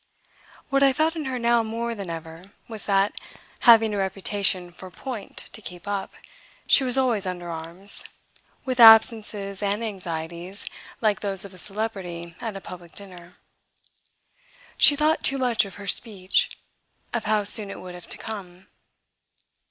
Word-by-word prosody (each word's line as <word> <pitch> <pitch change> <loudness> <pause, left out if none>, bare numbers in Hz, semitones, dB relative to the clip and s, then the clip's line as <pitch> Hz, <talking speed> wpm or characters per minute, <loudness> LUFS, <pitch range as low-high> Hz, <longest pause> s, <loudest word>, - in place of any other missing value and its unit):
What 275 0 +2
I 275 -1 +5
felt 315 +3 +1
in 315 -3 -4
her 260 -1 -3
now 235 0 +2
more 230 +1 -3
than 200 -5 -7
ever 165 +3 -9
was 220 -3 -8
that, 195 0 +2 0.6
having 225 -2 +7
a 205 - -2
reputation 190 -1 0
for 185 +2 -12
"point" 230 +2 -8 0.2
to 220 - -7
keep 180 -2 -10
up, 200 -1 -3 0.5
she - - +5
was 255 0 +3
always 235 -7 +1
under 175 -1 -5
arms, 170 +5 -2 0.6
with 255 -1 -3
absences 220 -3 +6
and 205 +2 -1
anxieties 175 -2 -5 0.4
like 215 -3 +1
those 195 -2 0
of 200 - -11
a - - -12
celebrity 185 -5 -3
at 220 -4 -4
a - - -9
public 175 -2 -11
dinner. 180 -3 -11 1.4
She 290 - +7
thought 305 +2 +1
too 275 - +3
much 245 -4 +2
of 195 - -11
her 200 - -10
"speech" 195 -1 0 0.6
of 235 - -2
how 210 0 +1
soon 205 0 +4
it - - -8
would 180 -1 -9
have 175 -1 -12
to - - -5
come. 190 -4 -8
200 Hz, 160 wpm, -24 LUFS, 185-230 Hz, 1.4 s, having